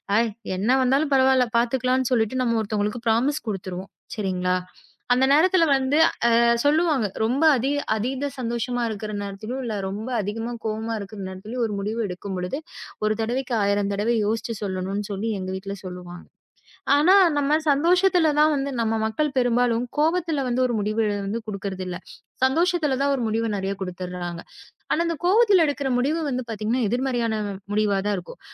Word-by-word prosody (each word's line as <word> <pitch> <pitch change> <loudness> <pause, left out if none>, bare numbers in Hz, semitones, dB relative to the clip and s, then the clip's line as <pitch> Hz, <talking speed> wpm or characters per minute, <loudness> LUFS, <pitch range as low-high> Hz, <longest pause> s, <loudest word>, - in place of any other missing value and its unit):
அ - - +5 0.4
என்னா 235 +7 +2
வந்தாலும் 280 +3 +2
பரவாயில்ல 260 -1 +4
பாத்துக்கலாம்னு 255 +1 +1
சொல்லிட்டு 230 +2 +1
நம்ம 230 -2 +1
ஒருத்தங்களுக்கு 210 +2 -2
ப்ராமிஸ் 260 +7 +1
குடுத்துருவோம். 185 -1 -5 0.3
சரிங்களா? 185 -3 0 0.6
அந்த 260 +2 +3
நேரத்துல 335 +3 +5
வந்து, 270 +3 +1 0.3
அ - - +4 0.3
சொல்லுவாங்க. 295 -6 +2 0.2
ரொம்ப 255 +8 +1
அதிக-அதீத 270 0 -1
சந்தோஷமா 240 +1 -2
இருக்கிற 215 0 -5
நேரத்திலயும், 215 +6 -5
இல்ல 220 -2 -3
ரொம்ப 215 +5 -5
அதிகமா 225 +4 -4
கோவமா 220 +1 -2
இருக்க 200 +1 -8
நேரத்திலயும் 215 +6 -5
ஒரு 210 -2 -3
முடிவு 215 +3 -3
எடுக்கும் 190 +1 -6
பொழுது, 180 +11 -3 0.5
1 215 - +2
தடவைக்கு 245 +2 -1
1000 200 0 +1
தடவை 220 +4 0
யோசிச்சு 225 +1 -2
சொல்லணும்ன்னு 195 +2 -3
சொல்லி 205 +3 -2
எங்க 185 0 -5
வீட்டுல 195 +1 -6
சொல்லுவாங்க. 180 -1 -9 0.7
ஆனா 345 +6 +5 0.2
நம்ம 290 +1 +2 0.2
சந்தோஷத்துல 355 +3 +3
தான் 305 +1 +5
வந்து 275 0 -2
நம்ம 225 0 0
மக்கள் 300 +8 0
பெரும்பாலும் 245 -1 +2
கோபத்துல 320 -2 +1
வந்து 250 +1 0
ஒரு 240 - -2
முடிவ 215 +2 -2 0.2
எழுந்து 200 +3 -3
குடுக்குறது 195 -2 -4
இல்ல. 180 - -4 0.5
சந்தோஷத்துல 315 0 +2
தான் 280 0 +2
ஒரு 250 - -3
முடிவு 225 +1 0
நெறயா 195 0 -2
குடுத்துடுர்றாங்க. 180 -2 -5 0.5
ஆனா 335 - +2
அந்த 335 -1 -1
கோவத்துல 400 -2 +5
எடுக்குற 285 -2 -1
முடிவு 295 +6 +1
வந்து 255 -1 -2
பாத்தீங்கன்னா, 225 +3 -1
எதிர்மறையான 245 -2 0 0.4
முடிவா 205 -1 +2
தான் 205 -1 +1
இருக்கும். 175 - -9
230 Hz, 155 wpm, -24 LUFS, 205-270 Hz, 0.7 s, அ